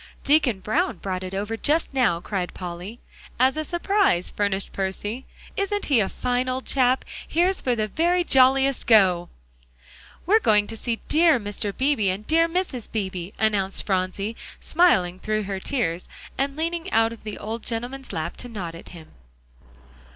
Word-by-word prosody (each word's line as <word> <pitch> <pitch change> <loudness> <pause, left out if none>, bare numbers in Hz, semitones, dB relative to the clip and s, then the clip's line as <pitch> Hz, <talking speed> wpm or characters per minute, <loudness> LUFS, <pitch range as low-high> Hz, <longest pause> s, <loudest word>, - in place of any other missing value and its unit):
"Deacon 280 -8 +3
Brown 215 +2 0
brought 185 0 -4
it 185 +1 -5
over 205 +3 -2
just 300 +6 0
now," 245 -11 +2
cried 180 0 -4
Polly. 180 +5 -7 0.4
"As 260 +2 +4
a 310 - -2
surprise," 345 - +1
furnished 200 -1 -1
Percy. 205 +6 -4 0.3
"Isn't 400 +1 -1
he 275 -5 +3
a 195 - +1
fine 250 +1 -1
old 255 +1 -3
chap? 255 -1 +2 0.2
Here's 360 +4 +1
for 250 -2 +1
the 215 -2 -1
very 345 - +1
jolliest 270 -2 +3
go!" 185 -6 +5 1.0
"We're 425 +5 +5
going 210 - +4
to 225 - -6
see 230 +1 -3
dear 320 -3 +5
Mr. 205 -1 -3
Beebe, 260 -7 +2
and 195 +3 -3
dear 330 +4 +3
Mrs. 330 - -3
Beebe," 190 -4 -3
announced 205 -3 0
Phronsie, 195 +3 -1 0.2
smiling 190 - +2
through 215 +1 -1
her 195 -1 -4
tears, 180 -8 -2 0.3
and 275 0 -1
leaning 335 +3 -3
out 225 0 +3
of 230 - -14
the 215 -1 -6
old 225 +2 -5
gentleman's 245 +4 -4
lap 160 +2 -4
to 245 - -7
nod 185 -7 -5
at 165 - -11
him. 165 -3 -12
225 Hz, 165 wpm, -24 LUFS, 195-275 Hz, 1.0 s, go